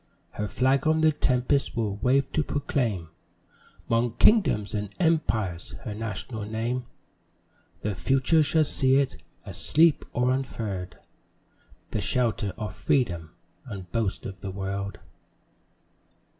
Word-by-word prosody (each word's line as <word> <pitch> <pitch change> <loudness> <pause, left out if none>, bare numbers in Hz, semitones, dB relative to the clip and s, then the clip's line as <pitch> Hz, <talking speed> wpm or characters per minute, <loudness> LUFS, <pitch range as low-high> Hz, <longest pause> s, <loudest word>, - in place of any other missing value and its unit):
Her 105 - -3
flag 130 +8 +2
on 160 0 +3
the 160 0 +5
tempest 135 -2 +1
will 105 -3 -1
wave 135 +5 +2
to 155 - +1
proclaim 120 - -1 0.8
'Mong 115 0 +1
kingdoms 190 - +4
and 105 -1 -2
empires 110 - 0
her 110 - -4
national 110 +1 -5
name; 120 +3 -2 1.0
The 105 - 0
Future 135 - +3
shall 155 +2 +3
see 135 -2 +2
it, 140 -1 +1 0.2
asleep 160 0 +3
or 125 +1 +2
unfurl'd, 110 -8 -3 0.9
The - - -1
shelter 115 -5 +1
of 105 -3 -4
Freedom 90 - 0 0.4
and 95 -3 -8
boast 110 -4 -1
of 95 -1 -7
the 100 - -4
world. 100 0 -4
115 Hz, 120 wpm, -27 LUFS, 100-135 Hz, 1.0 s, the